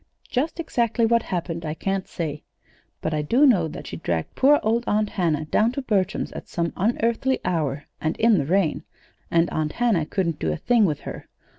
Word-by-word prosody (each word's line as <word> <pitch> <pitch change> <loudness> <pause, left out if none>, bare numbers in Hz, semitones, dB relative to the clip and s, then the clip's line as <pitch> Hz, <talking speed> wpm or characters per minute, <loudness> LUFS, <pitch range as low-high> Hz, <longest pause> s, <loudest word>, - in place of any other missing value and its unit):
Just 300 +7 -1
exactly 235 -7 +1
what 235 +1 +3
happened 170 -4 -4
I 155 -1 -3
can't 195 +2 -2
say, 150 -3 -4 0.6
but 160 - -2
I 150 - 0
do 240 - +4
know 195 - +4
that 155 - -8
she 85 - -6
dragged 80 -1 -2
poor 290 +2 +5
old 230 +2 +1
Aunt 210 0 +1
Hannah 160 -6 0
down 215 +9 +2
to 275 - -3
Bertram's 195 -6 0
at - - -9
some 170 -1 -2
unearthly 235 +5 +1
hour, 150 -4 -1 0.2
and 160 +1 -1
in 225 -4 +4
the 140 - -1
rain; 180 -3 +1 0.5
and 170 0 +3
Aunt 155 -1 -1
Hannah 220 -11 +1
couldn't 170 -4 -1
do 80 - 0
a 75 - -2
thing 235 -3 +3
with 155 -6 -1
her. - - -8
185 Hz, 195 wpm, -24 LUFS, 155-230 Hz, 0.6 s, poor